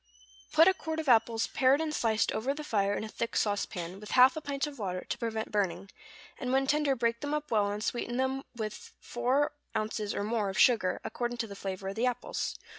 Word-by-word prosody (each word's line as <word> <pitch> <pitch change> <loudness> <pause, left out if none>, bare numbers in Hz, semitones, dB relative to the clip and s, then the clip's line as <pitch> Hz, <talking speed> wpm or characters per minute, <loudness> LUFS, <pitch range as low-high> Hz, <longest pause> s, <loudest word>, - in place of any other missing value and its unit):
= 60 +1 -25
Put 325 +3 +7
a 380 - +6
quart 320 -3 -4
of 315 - -4
apples 230 -1 +4
pared 265 +2 +3
and 315 -1 -2
sliced 225 -5 +1
over 255 +6 -1
the 300 - -6
fire 205 -7 +1
in - - -3
a - - -4
thick 230 +2 -4
sauce 205 -1 +1
pan, 175 +2 -6
with 210 - -10
half 255 +3 +8
a 315 - -4
pint 280 -1 -2
of 290 -3 -8
water, 185 -3 -3
to - - -2
prevent 225 -1 -3
burning, 195 -2 -1 0.5
and 250 - -2
when 270 +1 +3
tender 290 0 +2
break 235 -1 0
them 290 - -3 0.2
well 210 -3 +3
up 200 - -2
and 210 +1 -4
sweeten 240 +1 -2
them 265 +1 0
with 215 -2 -6
four 255 +4 0 0.2
ounces 215 -1 -2
or - - -1
more 215 -1 0
of 190 - -5
sugar, 215 -4 +4
according 240 0 -3
to 235 - -1
the 200 -2 -9
flavor 190 -1 -4
of - - -4
the 235 +3 +1
apples. 245 - -2
230 Hz, 235 wpm, -30 LUFS, 205-265 Hz, 0.5 s, half